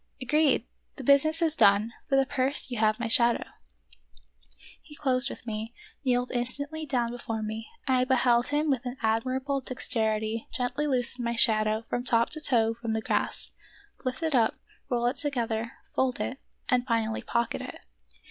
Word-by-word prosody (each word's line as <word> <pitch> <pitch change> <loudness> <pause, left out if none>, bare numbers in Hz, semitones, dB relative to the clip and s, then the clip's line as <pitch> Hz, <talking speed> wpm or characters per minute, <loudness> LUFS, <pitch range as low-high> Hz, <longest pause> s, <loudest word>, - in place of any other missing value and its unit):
"Agreed! 295 +3 +2 0.3
the 270 - -8
business 310 +5 +4
is 320 -2 +1
done; 210 0 +4 0.2
for 275 - +3
the 270 0 +4
purse 265 0 +2
you 240 - -3
have 215 0 +2
my 235 - -1
shadow! 235 +1 +3 0.7
" - - -23
He 295 - -14
closed 255 -4 +3
with - - -9
me; 220 +1 -5 0.3
kneeled 250 -1 +1
instantly 285 +6 -2
down 245 -4 0
before 225 -2 -4
me, 220 +1 -5 0.2
and 260 -1 +3
I 250 - +2
beheld 245 -2 +3
him 295 +1 +1
with 255 -3 -1
an 250 +1 -5
admirable 260 +5 0
dexterity 220 -3 -2
gently 260 +4 -2
loosen 250 -2 0
my 235 0 -1
shadow 215 -1 +2
from 245 - -2
top 235 -2 +3
to 310 - +1
toe 230 -5 +2
from 230 -1 -4
the 220 - -1
grass, - - -1 0.5
lift 255 +4 -3
it 320 -2 0
up, 230 -4 +3 0.3
roll 240 -1 0
it 245 - 0
together, 235 -6 -1 0.2
fold 260 -1 0
it, 265 - -3 0.3
and 250 -1 +1
finally 225 -2 0
pocket 235 -1 -1
it. - - -8
245 Hz, 175 wpm, -28 LUFS, 225-265 Hz, 0.7 s, business